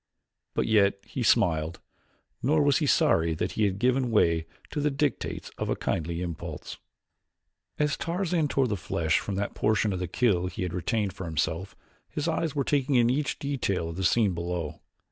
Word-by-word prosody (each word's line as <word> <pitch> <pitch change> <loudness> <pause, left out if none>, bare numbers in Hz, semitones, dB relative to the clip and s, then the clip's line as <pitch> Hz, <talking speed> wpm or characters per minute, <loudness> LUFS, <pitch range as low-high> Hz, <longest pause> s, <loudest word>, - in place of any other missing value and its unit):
But - - +1
yet 100 -3 +4
he - - -5
smiled, 80 -1 +2 0.6
nor 150 +4 +3
was 145 -2 +4
he 150 - 0
sorry 80 -9 +3
that - - -2
he 110 - +1
had 95 -1 0
given 125 +2 +2
way 85 -7 +2 0.2
to 150 - -2
the 150 - +2
dictates 145 0 -2
of - - -2
a - - +1
kindly 85 +2 -2
impulse. 85 -3 -6 1.0
As 150 -1 +1
Tarzan 170 -2 0
tore 135 -1 +2
the 105 - -1
flesh 80 -4 0
from 100 - -4
that 100 +1 -2
portion 105 -1 +1
of 90 - -3
the 90 - -2
kill 90 -2 +1
he 90 0 -4
had 90 -2 -3
retained 100 +2 -1
for 95 - -7
himself 80 +3 -2 0.3
his 150 +2 -3
eyes 160 -2 -1
were 140 - +1
taking 140 0 +1
in 120 -1 +5
each 140 +1 -1
detail 100 -12 -1
of 85 - -6
the 95 - -3
scene 100 +1 +3
below. 85 -2 -4
105 Hz, 185 wpm, -27 LUFS, 85-140 Hz, 1.0 s, in